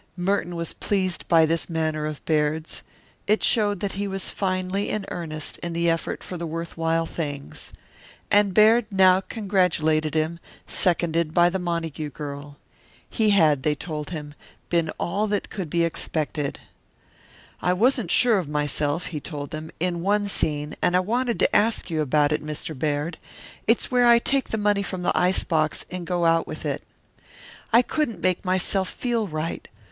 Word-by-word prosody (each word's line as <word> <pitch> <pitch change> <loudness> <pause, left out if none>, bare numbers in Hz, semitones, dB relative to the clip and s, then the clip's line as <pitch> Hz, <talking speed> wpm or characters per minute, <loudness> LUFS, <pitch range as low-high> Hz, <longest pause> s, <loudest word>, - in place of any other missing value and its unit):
Merton 180 -1 0
was 170 -1 -3
pleased 185 -4 -2
by 165 -2 +5
this 165 +2 -1
manner 155 -2 -1
of 155 -2 -7
Baird's. 155 0 0 0.5
It 215 +1 +2
showed 205 -5 +2
that 200 - -1
he 200 +1 -3
was 195 -1 -4
finely 185 +1 -1
in 210 -2 -2
earnest 155 -3 -5
in 170 -1 -4
the 170 0 +2
effort 165 -1 -3
for 180 - -6
the 170 0 -4
worth 165 +1 -5
while 165 0 +1
things. 145 -4 -6 0.6
And 205 -1 +4
Baird 215 +3 +5
now 190 -2 +5
congratulated 165 -7 0
him, 160 +2 0 0.3
seconded 170 -3 0
by 175 0 +5
the 190 - -1
Montague 165 -4 -3
girl. 145 0 -8 0.5
He 220 -1 +2
had, 160 -9 +4
they 150 +2 +1
told 150 0 -5
him, 150 -3 -6 0.4
been 170 -2 +1
all 205 +5 0
that 205 -1 -2
could 185 -6 -4
be 170 +2 +1
expected. 155 -3 -2 1.0
"I 180 - +2
wasn't 235 0 +2
sure 230 -1 +5
of 165 -6 -5
myself," 150 +1 0
he 150 - -2
told 145 -1 -6
them, 155 0 -6
"in 175 0 -1
one 205 +2 +1
scene, 150 -5 0
and 175 - +2
I - - +5
wanted 235 +5 0
to - - +3
ask 220 -4 +2
you 160 -1 0
about 150 +1 +2
it, 150 0 0
Mr. 155 +1 -5
Baird. 150 +4 -2 0.5
It's - - +2
where 245 -1 +4
I 235 0 +8
take 270 +3 +1
that 220 - -1
money 205 -1 +2
from 185 -2 -4
the - - +1
ice 180 +1 +2
box 155 -2 0
and 180 -2 -5
go 175 -1 0
out 165 0 +3
with - - -7
it. - - -2 0.9
I 235 +2 +6
couldn't 240 - -2
make 185 0 0
myself 185 0 0
feel 235 -4 -1
right. 155 0 -4
170 Hz, 175 wpm, -24 LUFS, 155-195 Hz, 1.0 s, I